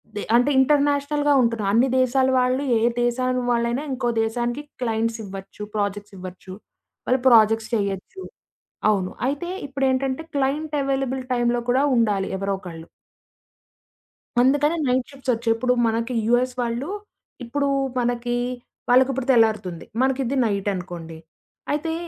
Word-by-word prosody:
They 205 - -3
అంటే 245 +4 +4
ఇంటర్నేషనల్‌గా 290 +1 +2
ఉంటున్నాయి 230 -4 0
అన్ని 250 +3 +4
దేశాల 260 +1 +2
వాళ్ళు 255 +2 +1 0.2
ఏ - - -3 0.2
దేశం 255 +1 0
వాళ్ళైనా, 235 +4 0
ఇంకో 245 -2 -1
దేశానికి 240 +4 -2 0.2
క్లయింట్స్ 225 0 -1
ఇవ్వచ్చు, 195 +1 -10
ప్రాజెక్ట్స్ 205 0 -3
ఇవ్వచ్చు. 185 0 -9 0.5
వాళ్ళు 255 0 +2
ప్రాజెక్ట్స్ 225 0 +4
చెయ్యొచ్చు. 200 - -3 0.7
అవును. 190 -3 0 0.2
అయితే 290 +5 -3 0.2
ఇప్పుడేంటంటే, 265 +1 0
క్లయింట్ 295 +3 -1
అవైలబుల్ 270 -1 -1
టైమ్‌లో 240 0 +1
కూడా 260 +3 +3
ఉండాలి 205 -4 +1
ఎవరో 195 +1 -1
ఒకళ్ళు. 165 -2 -9 1.6
అందుకని 290 +5 +3
నైట్ 250 0 0
షిఫ్ట్స్ 265 -2 -2
ఒచ్చాయి. 230 0 +1
ఇప్పుడు 250 +2 +1
మనకి 230 +2 -1
యూఎస్ 250 +2 +2
వాళ్ళు, 240 +6 -2 0.5
ఇప్పుడు 280 +4 -1 0.3
మనకి 240 0 -1 0.5
వాళ్ళకి 255 +2 +5
ఇప్పుడు 265 0 -4
తెల్లారుతుంది. 215 -7 +1 0.2
మనకిది 265 0 0
నైట్ 200 -2 -1
అనుకోండి. 175 -3 -7 0.5
అయితే 320 +2 -1
245 Hz, 125 wpm, -23 LUFS, 220-270 Hz, 1.6 s, వాళ్ళకి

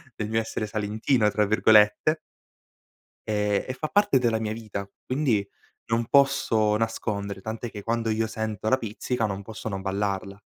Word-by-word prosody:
del 105 -1 -4
mio 110 0 +1
essere 110 -1 -3
"salentino", 110 +2 +1
tra 105 -1 +1
virgolette 110 +8 +4 1.1
e 105 -1 +1
e - - -1
fa 155 +4 -4
parte 205 -9 +3
della 115 -3 +1
mia 110 -1 -2
vita, 105 -3 -6 0.2
quindi 125 -7 0 0.4
non 115 0 0
posso 120 -7 +3
nascondere, 100 -3 -2
tant'è 110 +3 -5
che 105 -2 -8
quando 115 +1 -1
io 110 +1 +1
sento 110 -1 -3
la 130 - +4
pizzica 115 +1 -2
non 100 -1 -4
posso 110 +2 -7
non 95 -2 -4
ballarla. 100 0 -3
110 Hz, 160 wpm, -26 LUFS, 105-115 Hz, 1.1 s, virgolette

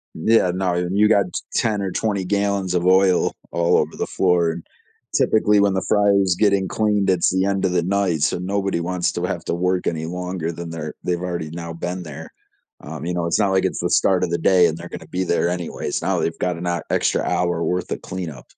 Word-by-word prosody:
Yeah, 110 +1 +3
no, 95 -1 0
and 90 +2 -1
you 105 +1 +5
got 100 -3 +4
t - - -3
10 105 -3 +1
or 95 - -2
20 100 -1 -1
gallons 100 -1 0
of 90 -1 0
oil 95 0 +4 0.2
all 85 0 +2
over - - -1
the - - -3
floor, 90 -3 +2
and 80 0 -8 0.5
typically, 105 -1 +3
when 100 -1 +3
the 95 -1 -1
fryer's 100 -3 +3
getting 100 -3 +3
cleaned, 105 -1 +1
it's 90 -2 +3
the 95 +1 +1
end 100 -1 0
of 90 - +1
the 90 -1 +2
night, 95 -4 0
so - - +1
nobody 95 0 -1
wants 90 +1 -1
to - - -3
have - - -3
to - - -1
work 90 +1 0
any 80 -1 -2
longer 90 -1 -4
than 85 0 -7
they're 80 -2 -6
they've 90 -1 -1
already 85 -4 -3
now 85 0 -6
been 90 +2 -4
there, 80 0 -9 0.5
um, 80 0 -7
you 90 - -2
know, 85 -1 -1
it's 85 +5 +1
not 100 -2 +2
like 95 0 +2
it's 95 - -2
the 90 - -1
start 95 +1 +3
of - - 0
the 85 - +1
day 90 -2 +4
and 80 - -3
they're 85 +1 -9
gonna - - -9
be 95 +1 -2
there 85 -1 +1
anyways, 90 -2 -3
now - - 0
they've 80 - -2
got 90 -1 -1
an 85 - -6
hou 85 0 -1
extra - - +1
hour 85 -1 0
worth 90 0 -2
of - - -3
cleanup. 90 -6 -7
90 Hz, 235 wpm, -21 LUFS, 85-95 Hz, 0.5 s, you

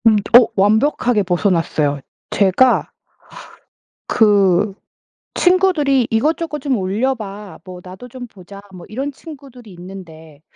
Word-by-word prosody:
음. 220 - +5 0.2
어. 245 - +5
완벽하게 220 +2 +2
벗어났어요. 165 -6 0 0.3
제가 205 +6 +2 1.2
그 200 -2 +2 0.6
친구들이 350 -9 +2
"이것저것 300 +6 -1
좀 270 -2 -1
올려 215 +7 -1
봐. 205 -3 -10
뭐 180 -1 -10
나도 185 +7 -12
좀 250 0 -9
보자." 200 -2 -14
뭐 180 -2 -12
이런 270 +6 -5
친구들이 270 - -13
있는데 170 -5 -13
210 Hz, 240 characters per minute, -18 LUFS, 185-260 Hz, 1.2 s, 음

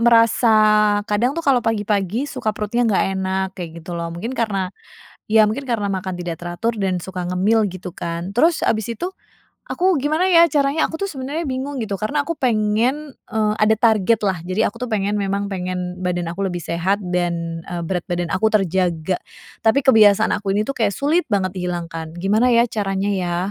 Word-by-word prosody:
merasa 230 -1 +4 0.5
kadang 230 +6 +1
tuh 335 - -3
kalau 265 -5 +4
pagi-pagi 210 +1 0
suka 230 -5 -2
perutnya 235 +3 0
nggak 200 - +2 0.2
enak 190 0 -1
kayak 175 -3 -5
gitu 175 - -7
loh. 170 0 -3
Mungkin 220 +9 -5
karena 200 -6 -1 0.6
ya 220 -1 +6
mungkin 230 +7 -3
karena 230 -6 -1
makan 190 -1 -3
tidak 175 -1 -5
teratur 200 +7 -2
dan 190 -4 -1
suka 180 0 -6
ngemil 210 +5 +2
gitu 185 -1 -7
kan. 170 +2 -4
Terus 325 +6 +3
habis 220 0 0
itu 350 - -4 0.6
aku 370 -1 +2
gimana 310 +7 +1
ya 335 -2 +7
caranya 285 +1 +1
aku 320 - -5
tuh 395 - -1
sebenernya 280 +5 -4
bingung 265 +2 -3
gitu 205 -3 -3
karena 285 +9 -1
aku 335 - -2
pengen, 245 +5 0
eee, 215 -1 0
ada 215 +1 +3
targetlah. 210 -5 +2
Jadi 185 +4 -2
aku 220 - -11
tuh - - -6
pengen, 205 0 0
memang 200 0 -1
pengen 180 -1 -4
badan 175 -1 -1
aku 195 +3 -3
lebih 180 -2 -2
sehat 170 +5 -1
dan, 170 -2 -2
eee, 175 -2 -5
berat 180 0 -2
badan 175 -1 -2
aku 220 +3 +2
terjaga. 180 -3 +1 0.5
Tapi 225 +5 +4
kebiasaan 215 -4 +6
aku 200 -2 -2
ini 205 - +1
tuh 275 - -3
kayak 215 -4 +1
sulit 315 +5 +1
banget 190 -1 0
dihilangkan. 170 -3 -4
Gimana 215 +7 +2
ya 235 0 +5
caranya 195 -2 -2
ya? 180 -3 -1
205 Hz, 185 wpm, -20 LUFS, 180-235 Hz, 0.6 s, ya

